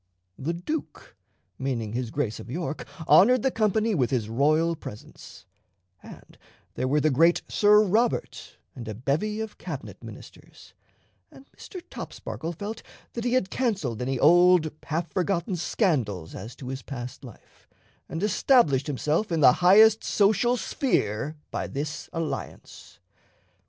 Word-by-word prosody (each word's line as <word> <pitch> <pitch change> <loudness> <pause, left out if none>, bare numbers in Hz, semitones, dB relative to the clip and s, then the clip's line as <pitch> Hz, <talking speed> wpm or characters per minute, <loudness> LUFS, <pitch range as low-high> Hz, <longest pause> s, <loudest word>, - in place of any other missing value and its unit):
The 155 +5 -2
Duke, 300 - -6 0.4
meaning 120 -6 -3
his 120 -1 -3
Grace 115 -4 -3
of - - -10
York, 160 +2 -4 0.2
honored 215 +10 +6
the 265 - +2
company 220 0 +1
with 130 -10 +1
his 120 -5 -1
royal 155 +7 +2
presence, 105 -9 -12 0.6
and - - -14 0.3
there 130 - -2
were 145 +3 +2
the 155 +1 +2
great 165 +6 +3
Sir 210 0 +5
Robert 220 +5 -1 0.2
and 120 -4 -8
a 110 - -5
bevy 160 - -1
of 220 -1 -7
Cabinet - - -8
ministers, - - -13 0.6
and 270 - -16
Mr. 365 -3 -10
Topsparkle 165 +1 -6
felt 205 +6 -6 0.3
that 235 0 -4
he 245 - 0
had 255 -7 +1
canceled 195 - -1
any 130 +1 -1
old 175 +2 +5
half 165 +1 -3
forgotten 185 0 -1
scandals 125 - -1
as 115 +2 -8
to 130 - -8
his 135 0 -5
past 125 -2 -8
life, 120 -5 -16 0.4
and 165 +4 -4
established 200 - +3
himself 150 - -1
in 165 -2 0
the 125 -3 +8
highest 215 +5 +6
social 220 +4 +2
sphere 150 - -1 0.2
by - - -3
this 145 +1 -5
alliance. 165 -2 -6
165 Hz, 140 wpm, -26 LUFS, 130-210 Hz, 0.6 s, the